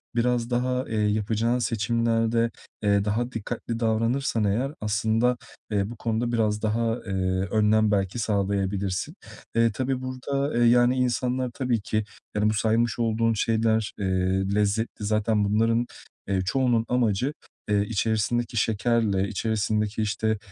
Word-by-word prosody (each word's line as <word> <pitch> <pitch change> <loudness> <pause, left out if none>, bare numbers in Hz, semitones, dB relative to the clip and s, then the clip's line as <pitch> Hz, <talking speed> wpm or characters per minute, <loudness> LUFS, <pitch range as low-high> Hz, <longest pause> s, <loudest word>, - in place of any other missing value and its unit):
biraz 120 0 +1
daha, 125 +1 0
eee, 110 - -2
yapacağın 110 +3 +1
seçimlerde, 115 0 +1 0.3
eee, 100 -1 +3
daha 120 +4 -1
dikkatli 115 +1 -4
davranırsan 115 +1 +1
eğer 115 +7 0
aslında, 110 +4 +1 0.3
eee, 100 -1 0
bu 120 - -7
konuda 115 +1 -1
biraz 105 -2 +1
daha, 115 +1 0
eee, 100 - -5 0.4
önlem 110 0 +3
belki 100 +2 0
sağlayabilirsin. 100 - -1 0.4
Eee, 115 0 +4
tabii 130 +3 -2
burada, 130 +2 -2
eee, 120 - +4
yani, 120 +1 +5
insanlar 125 0 0
tabii 125 -5 -1
ki, 110 +1 -1 0.3
yani, 105 +1 +2
bu - - +1
saymış 115 +1 +1
olduğun 115 0 +1
şeyler, 110 0 +1
eee, 100 - -1 0.5
lezzetli. 105 +1 0
Zaten 105 0 +1
bunların, 115 +3 +2 0.4
eee, 95 -1 +1
çoğunun 120 +1 +1
amacı, 125 +2 +1 0.4
eee, 105 -1 +3
içerisindeki 115 +3 0
şekerle 110 -2 +1
içerisindeki, 110 +1 -1
işte, 110 +1 0
115 Hz, 130 wpm, -25 LUFS, 105-120 Hz, 0.5 s, yani